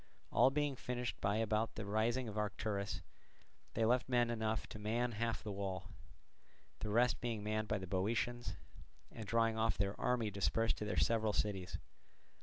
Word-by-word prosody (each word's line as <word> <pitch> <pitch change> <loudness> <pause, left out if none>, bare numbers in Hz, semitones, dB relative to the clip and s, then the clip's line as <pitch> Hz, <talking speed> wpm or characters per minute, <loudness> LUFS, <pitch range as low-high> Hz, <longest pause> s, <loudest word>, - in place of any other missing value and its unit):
All 130 - +6
being 145 0 0
finished 125 -1 -3
by 100 +1 +2
about 110 0 +1
the 110 - -4
rising 115 +5 +1
of 105 - -5
Arcturus, 105 -1 -2 0.7
they 115 - +3
left 125 +2 +3
men 120 -1 +3
enough 110 -1 0
to 110 - -7
man 115 +4 0
half 115 +1 -1
the 105 - -3
wall, 95 -1 -4 0.9
the 105 - -3
rest 120 +3 +3
being 115 -3 -2
manned 110 0 -1
by 105 - +1
the 95 - -5
Boeotians, 110 +6 -1 0.6
and 110 -2 -7
drawing 115 0 +2
off 110 -3 +2
their 100 0 +1
army 120 -4 +1
dispersed 100 +4 +1
to 105 - -3
their 105 - -2
several 110 -2 +3
cities. 95 -4 -1
110 Hz, 170 wpm, -37 LUFS, 105-120 Hz, 0.9 s, All